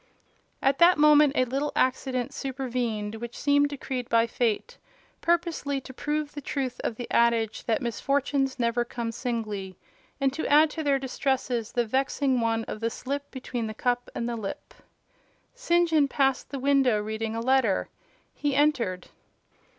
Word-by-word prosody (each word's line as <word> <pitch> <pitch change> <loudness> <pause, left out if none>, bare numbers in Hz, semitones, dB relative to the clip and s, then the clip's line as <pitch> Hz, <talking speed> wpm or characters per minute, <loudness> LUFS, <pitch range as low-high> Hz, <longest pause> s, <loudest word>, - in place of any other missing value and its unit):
At 270 0 +2
that 350 0 +7
moment 300 -1 +6
a 255 - +3
little 275 +4 -2
accident 260 +1 0
supervened, 245 -6 -3
which 235 +1 -7
seemed 285 0 +3
decreed 260 -3 -5
by 230 0 +4
fate 240 - -2 0.4
purposely 335 -5 0
to 260 - -11
prove 295 +2 -2
the 290 - -6
truth 260 -3 -3
of 225 - -2
the 240 +1 -6
adage, 230 -2 +2
that 230 +3 0
"misfortunes 270 +3 0
never 235 0 +1
come 235 -1 -4
singly," 215 -6 -4 0.4
and 270 -1 +1
to 315 - -3
add 300 +1 +5
to 320 - -4
their 285 -2 +2
distresses 260 -3 -2
the 240 -1 +1
vexing 265 +1 +1
one 225 0 0
of 215 - -6
the 230 +1 0
slip 280 +4 -5
between 245 -3 -4
the 215 - -6
cup 245 +1 -1
and 235 - -2
the 240 - -2
lip. 210 -4 -6 0.8
St. 345 -9 +2
John 310 -3 +3
passed 270 -1 +1
the 280 - -4
window 270 -4 +3
reading 220 +1 -3
a - - -2
letter. 245 -4 +2 0.5
He 290 -2 -1
entered. 245 - +1
260 Hz, 160 wpm, -27 LUFS, 230-285 Hz, 0.8 s, that